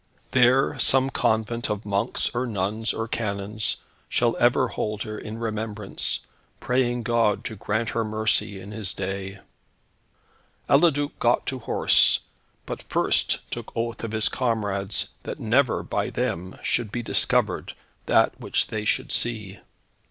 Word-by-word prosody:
There 130 +2 +4
some 135 +2 +4
convent 110 0 0
of 105 0 -3
monks 100 +4 0
or 125 +1 -1
nuns 110 +1 -1
or 115 0 -3
canons 105 -1 -1 0.3
shall 120 -1 +2
ever 120 0 +3
hold 105 -1 -3
her 110 -1 -6
in 105 +1 -7
remembrance, 110 -2 -2 0.4
praying 125 -1 0
God 115 -3 +1
to 110 - -4
grant 105 +4 -1
her 115 - 0
mercy 110 -2 0
in 95 +2 -9
His 105 -3 -4
day." 95 0 -4 1.3
Eliduc 145 -1 +3
got 120 0 +2
to 130 - -3
horse, 115 - +4 0.4
but - - -5
first - - +1
took - - -5
oath 115 0 -2
of 115 - -3
his 110 0 +2
comrades 105 -5 -1
that - - -6
never, - - +2
by - - -1
them, 90 +3 -3
should 115 -4 0
be 120 +1 -3
discovered, - - +1 0.3
that - - +3
which - - +1
they 110 -1 -3
should - - 0
see. 110 -3 0
110 Hz, 140 wpm, -25 LUFS, 105-120 Hz, 1.3 s, There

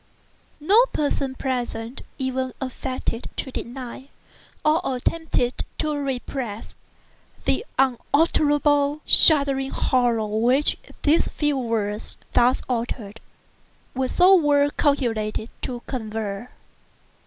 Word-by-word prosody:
No 410 +11 +5
person 275 -2 -1
present 245 -2 -3 0.2
even 260 -1 -2
affected 255 -2 -4
to 265 - -4
deny, 255 +1 -7 0.6
or 305 +2 +4
attempted 255 -1 -1
to 305 -1 -1
repress, 260 -5 -4 0.7
the - - +1
unutterable, 290 +2 +2
shuddering 275 -3 +5
horror 240 -5 +1
which 235 +7 +2 0.3
these 305 +3 +3
few 295 -1 -1
words, 225 -4 -2 0.2
thus 245 +2 +3
uttered, 230 -3 -3 0.7
were 260 0 -1
so 365 +6 +5
well 290 -5 +4
calculated 225 -6 0
to 245 -2 -5
convey. 220 -3 -4
260 Hz, 95 wpm, -23 LUFS, 235-290 Hz, 0.7 s, No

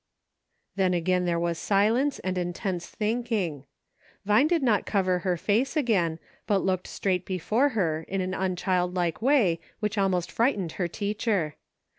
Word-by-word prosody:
^ - - -55 0.4
" - - -50
Then 185 -2 +2
again 180 +1 +1
there 170 -1 +1
was 170 -1 -1
silence 225 +8 +2
and 185 0 -3
intense 175 0 -3
think 235 +2 -2
ing. 165 - -1 0.6
Vine 210 +8 +4
did 335 -3 +1
not 220 -6 +2
cover 185 -3 +1
her 180 -1 -1
face 235 - 0
again, 190 - +1 0.3
but 200 -2 +1
looked 185 -1 0
straight 185 -2 -1
before 215 - +1
her 160 -5 0
in 195 - -2
an 185 0 -2
unchildlike 180 -2 -1
way 230 - +3 0.2
which 210 -1 -1
almost 185 -3 +1
frightened 210 - +1
her 180 - 0
teacher. 200 - -1
190 Hz, 160 wpm, -27 LUFS, 175-215 Hz, 0.6 s, Vine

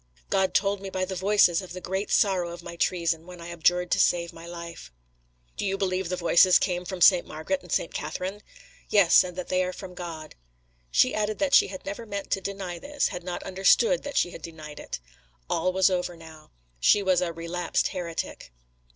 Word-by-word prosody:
"God 190 -1 +1
told 200 0 +1
me 195 - -6
by 185 0 -2
the 190 - -5
Voices 190 -2 +3
of 185 -2 -9
the 185 - -6
great 190 +3 -3
sorrow 185 -4 +2
of 170 0 -9
my 170 0 -8
treason, 170 -1 0
when 180 -1 -10
I 170 0 -8
abjured 175 +1 +1
to - - +2
save 170 0 +2
my 165 +1 -11
life." 170 - -9 0.7
"Do - - -3
you 195 -1 -1
believe 185 -2 -1
the 180 - -1
Voices 180 +1 +5
came 180 -1 -1
from 185 -1 -6
St. 180 0 +7
Margaret 275 - -3
and - - -13
St. - - 0
Catherine?" 190 +3 -4 0.5
"Yes, 200 -5 +6
and 180 -1 -8
that 180 - -5
they 185 0 +2
are 180 - -2
from 185 -1 -9
God." 165 -3 -8 0.6
She - - +3
added 215 0 -1
that 285 -2 0
she - - +7
had 190 -1 -9
never 205 +4 -6
meant 200 -1 -5
to 195 - +1
deny 190 -3 -5
this, 290 +5 -1
had 180 - -6
not 180 0 -5
understood 195 - +3
that 285 - -5
she 175 - +2
had 165 - -10
denied 155 -3 -9
it. - - -6 0.5
All 180 +3 +1
was 190 +1 +3
over 180 -1 -2
now; 160 -1 -14 0.3
she 200 - +4
was 185 -2 +3
a 175 -2 -1
"relapsed 170 +1 -2
heretic." 170 - -5
180 Hz, 210 wpm, -26 LUFS, 170-195 Hz, 0.7 s, St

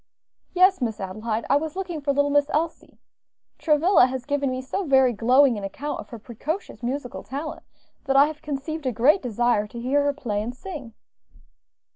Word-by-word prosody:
"Yes, 370 -2 +5
Miss 225 -3 -2
Adelaide; 215 +4 -3
I 280 - +4
was 315 +2 -4
looking 360 -5 -4
for 280 0 0
little 285 +1 +1
Miss 290 0 +3
Elsie. 320 +2 -3 0.6
Travilla 310 -2 +4
has 255 -1 -5
given 285 -1 0
me 255 0 -3
so 260 +10 -3
very 265 -5 +4
glowing 245 +2 +4
an - - -9
account 270 +10 -4
of - - -9
her 235 - -8
precocious 265 - -6
musical 250 +1 -4
talent, 300 +4 -6 0.4
that 270 -1 0
I 275 +1 +8
have 305 0 -6
conceived 295 +1 -4
a - - +1
great 255 - +3
desire 240 -3 +1
to 235 - -9
hear 270 +4 +1
her 285 - +1
play 230 -8 -3
and 240 +3 -5
sing." 275 - -8
275 Hz, 185 wpm, -24 LUFS, 240-300 Hz, 0.6 s, I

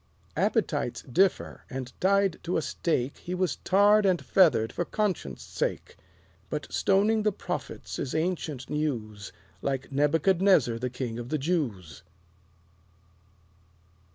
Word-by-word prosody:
Appetites - - 0
differ; 185 +9 +1
and 130 -1 -6
tied 195 -1 +2
to 175 +2 -1
a - - +1
stake 135 -1 -1
He 180 - -5
was 180 -4 0
tarred 205 +3 +4
and 185 -3 +3
feathered 130 - +3
for - - -1
Conscience' 210 +1 -2
Sake. - - -3 0.5
But - - -3
stoning 210 +3 +3
the 210 0 +2
prophets - - -5
is 130 - -3
ancient 160 -5 -2
news, 110 -10 -3 0.3
Like 135 0 -3
Nebuchadnezzar 150 -2 +3
the 125 +1 -2
King 120 -2 -4
of 120 0 -7
the 155 - 0
Jews. 135 - -2
155 Hz, 125 wpm, -28 LUFS, 125-190 Hz, 0.5 s, tarred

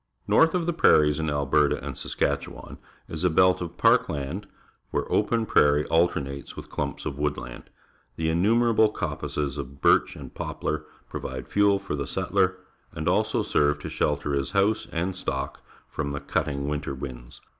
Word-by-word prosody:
North 160 +2 +4
of 175 -2 0
the 175 - 0
prairies 75 - +4
in 80 -1 -1
Alberta 75 0 +2
and - - -5
Saskatchewan - - -3 0.3
is 80 +1 -5
a 90 - +4
belt 90 +3 +4
of 85 -1 -6
park - - +4
land, 75 +8 -4 0.4
where - - -1
open 115 +2 +2
prairie 75 -5 +4
alternates 70 -5 0
with - - -10
clumps - - -3
of 70 - -4
wood 75 0 0
land. - - -9 0.5
The 80 +2 -2
innumerable 110 +6 +3
coppices 75 -8 -3
of 70 0 -7
birch - - +3
and - - -10
poplar - - -3 0.2
pro\'ide - - -6
fuel 100 -1 +3
for 75 - -4
the 70 -2 -3
settler, 95 +3 0 0.3
and 80 +1 -5
also 110 +4 +2
serve 75 0 +2
to - - -6
shelter 75 -1 0
his 70 +4 -1
house 100 -1 +2
and 90 +3 -2
stock 65 -6 -4 0.3
from 70 -2 -4
the 70 - -3
cutting 70 -1 -2
^ 75 - -1
inter 75 -2 -4
winds. 65 -3 -8
75 Hz, 170 wpm, -26 LUFS, 70-95 Hz, 0.5 s, North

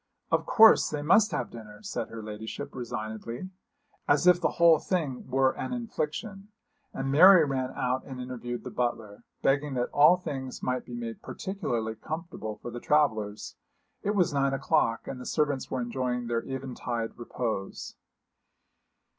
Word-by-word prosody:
'Of - - +1
course, 225 0 +7
they 150 -1 -3
must 210 +8 +5
have - - -3
dinner,' 105 -2 -11
said - - -3
her 115 -1 -8
ladyship, 110 +1 -6
resignedly, 115 - -5 0.6
as 145 +3 +3
if 180 -1 +6
the - - +1
whole 170 -2 +6
thing 155 -9 -2
were 130 +1 +3
an - - -5
infliction; 205 -3 -4 0.4
and 135 0 -3
Mary 175 +3 +8
ran 130 -2 -2
out 125 +1 -1
and 130 -2 -8
interviewed 120 -1 -5
the - - -7
butler, 115 -4 -3 0.2
begging 140 0 +1
that 125 -1 -1
all 150 +5 +7
things 135 -7 -6
might 125 0 -1
be 120 - -8
made 115 -1 -6
particularly 120 - -3
comfortable 155 -3 -6
for 120 - -8
the 120 - -6
travellers. 110 -9 0 0.4
It 205 +1 -1
was 175 -5 +2
nine 140 -1 +1
o'clock, 135 -5 +1
and 125 - -6
the - - -8
servants 145 -4 0
were 130 - -2
enjoying 125 0 -2
their 115 0 -1
eventide 125 -3 -4
repose. 115 -4 -4
130 Hz, 155 wpm, -28 LUFS, 120-155 Hz, 0.6 s, Mary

